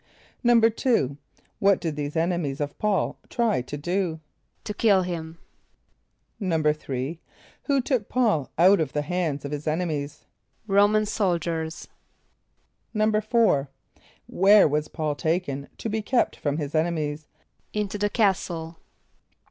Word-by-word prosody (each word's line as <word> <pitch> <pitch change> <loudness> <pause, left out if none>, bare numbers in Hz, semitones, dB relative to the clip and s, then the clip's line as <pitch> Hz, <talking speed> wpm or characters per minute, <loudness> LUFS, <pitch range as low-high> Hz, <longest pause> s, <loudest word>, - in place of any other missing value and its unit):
= - - -33
=2.= 230 - +3 0.4
What 200 -1 +4
did 165 -4 -3
these 145 +1 -4
enemies 165 -4 -1
of 145 -1 -3
P[a:]ul 210 -3 0
try 230 - +1
to 135 +4 -7
do? 175 +1 -1 0.4
=To 210 - -4
kill 200 -3 +3
him.= 165 -2 -5 1.0
=3.= 155 -4 -1 0.5
Who 280 -2 +2
took 250 -5 -1
P[a:]ul 220 - +1
out 185 +4 +6
of 155 -5 -1
the 150 - 0
hands 155 -4 -2
of 140 - -5
his 150 +1 -5
enemies? 155 -3 -2 0.4
=R[=o]´man 205 +1 +4
soldiers.= 170 -6 -2 1.1
=4.= 215 - +2 0.6
Where 200 +1 +5
was 150 +1 -1
P[a:]ul 155 -2 -2
taken 145 -3 -2
to - - -4
be 220 0 -1
kept 245 +3 +1
from 145 0 -2
his 145 -2 -4
enemies? 155 -2 -1 0.4
=Into 210 -1 -3
the 205 +1 +1
castle. 175 -6 0
170 Hz, 125 wpm, -25 LUFS, 150-210 Hz, 1.1 s, out